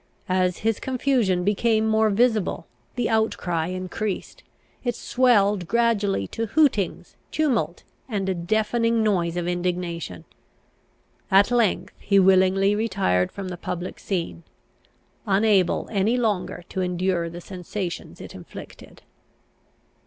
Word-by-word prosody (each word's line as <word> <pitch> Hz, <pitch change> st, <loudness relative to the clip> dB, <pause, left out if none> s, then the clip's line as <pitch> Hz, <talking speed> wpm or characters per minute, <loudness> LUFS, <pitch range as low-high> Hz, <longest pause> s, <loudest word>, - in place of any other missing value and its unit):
As 185 Hz, -1 st, +1 dB
his 225 Hz, -2 st, +1 dB
confusion 250 Hz, -8 st, +1 dB
became 220 Hz, +2 st, +2 dB
more 220 Hz, 0 st, +3 dB
visible, 220 Hz, -1 st, +1 dB, 0.3 s
the 245 Hz, -2 st, 0 dB
outcry 180 Hz, -7 st, 0 dB
increased. 185 Hz, +2 st, -4 dB, 0.4 s
It 245 Hz, -1 st, -1 dB
swelled 205 Hz, -7 st, +2 dB
gradually 210 Hz, -, +1 dB
to 225 Hz, 0 st, -3 dB
hootings, 250 Hz, -, +1 dB, 0.2 s
tumult, 230 Hz, -, 0 dB, 0.3 s
and 200 Hz, -4 st, -2 dB
a 190 Hz, -, +1 dB
deafening 220 Hz, +5 st, +1 dB
noise 175 Hz, -5 st, +1 dB
of 175 Hz, -1 st, -2 dB
indignation. 175 Hz, -, -3 dB, 1.0 s
At 200 Hz, +4 st, +5 dB
length 205 Hz, -6 st, +1 dB
he 200 Hz, -, +2 dB
willingly 190 Hz, +1 st, +4 dB
retired 195 Hz, -, +1 dB
from 195 Hz, -2 st, -6 dB
the 180 Hz, -, -6 dB
public 180 Hz, +1 st, -5 dB
scene, 175 Hz, -3 st, -3 dB, 0.9 s
unable 195 Hz, -2 st, +2 dB
any 215 Hz, +4 st, +1 dB
longer 210 Hz, -7 st, -1 dB
to 190 Hz, -, -3 dB
endure 180 Hz, -1 st, 0 dB
the 170 Hz, +1 st, -8 dB
sensations 180 Hz, 0 st, -6 dB
it -, -, -9 dB
inflicted. -, -, -12 dB
195 Hz, 115 wpm, -24 LUFS, 180-220 Hz, 1.0 s, At